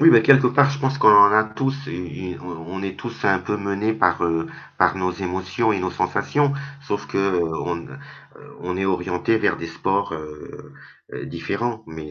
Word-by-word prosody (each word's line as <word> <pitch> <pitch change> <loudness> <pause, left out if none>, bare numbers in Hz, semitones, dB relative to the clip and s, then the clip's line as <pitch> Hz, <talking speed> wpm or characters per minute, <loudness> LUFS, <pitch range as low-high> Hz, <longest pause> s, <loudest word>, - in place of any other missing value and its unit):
Oui, 165 +2 +8
bah 115 - +8
quelque 130 +2 +6
part 140 +2 +4
je 140 - -4
pense 135 +1 0
qu'on - - +5
en 100 -1 +9
a 110 0 +5
tous 135 +5 -3
une 90 +1 -5
une 90 +1 -7
on 90 - -8 0.2
on 95 - -5
est 95 -1 -5
tous 120 -1 -7
un 95 -1 +4
peu 105 +3 -3
menés 100 +2 -1
par, 90 -5 +2
heu, 80 -1 -1 0.3
par - - +3
nos 90 0 -1
émotions 95 +4 -1
et 100 - -1
nos 95 0 -2
sensations. 145 +7 0 0.3
Sauf 100 - -3
qu'on, 85 -3 -1
heu, - - -11 0.6
on 90 +1 -4
est 95 - -1
orientés 95 +3 0
vers - - +1
des 85 - -6
sports, 95 +2 -1
heu 75 -1 -9 0.4
heu, - - -6
différents 115 -2 -4
mais 80 -1 -9
95 Hz, 200 wpm, -22 LUFS, 90-115 Hz, 0.6 s, en